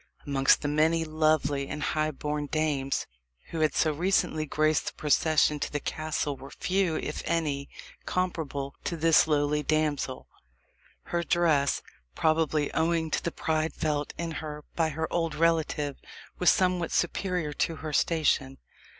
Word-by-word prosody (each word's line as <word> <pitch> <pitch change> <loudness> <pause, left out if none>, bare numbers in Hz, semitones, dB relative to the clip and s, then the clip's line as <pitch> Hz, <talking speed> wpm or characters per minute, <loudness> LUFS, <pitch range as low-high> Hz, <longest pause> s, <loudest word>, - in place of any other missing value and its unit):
Amongst 135 -1 +3
the - - 0
many 160 +2 +2
lovely 155 -3 +1
and 150 - -4
high 155 0 0
born 150 0 -3
dames 145 -3 0 0.5
who 165 - -3
had 155 -2 +2
so 155 -1 +2
recently 160 -2 +1
graced 155 +1 +1
the - - -3
procession 150 0 +2
to - - -3
the 145 - -1
castle 155 -1 -2
were 135 +1 -11
few, 185 -1 0
if - - -3
any, 150 -4 -1 0.4
comparable 155 -6 -2
to 170 - -2
this 165 0 +5
lowly 150 -1 +1
damsel. 150 -3 -1 0.8
Her 170 - -1
dress 160 -5 +2 0.3
probably 155 -2 +1
owing 160 0 +1
to - - 0
the 170 - -1
pride 160 0 -1
felt 150 -1 -2
in 170 0 -3
her 150 -1 -7
by 165 -2 +2
her 160 +2 -2
old 165 -3 0
relative 155 -3 +1 0.4
was 180 - +5
somewhat 180 -2 +2
superior 175 -3 -1
to 165 +3 -1
her 155 - -4
station. 140 -4 +1
155 Hz, 150 wpm, -28 LUFS, 145-165 Hz, 0.8 s, this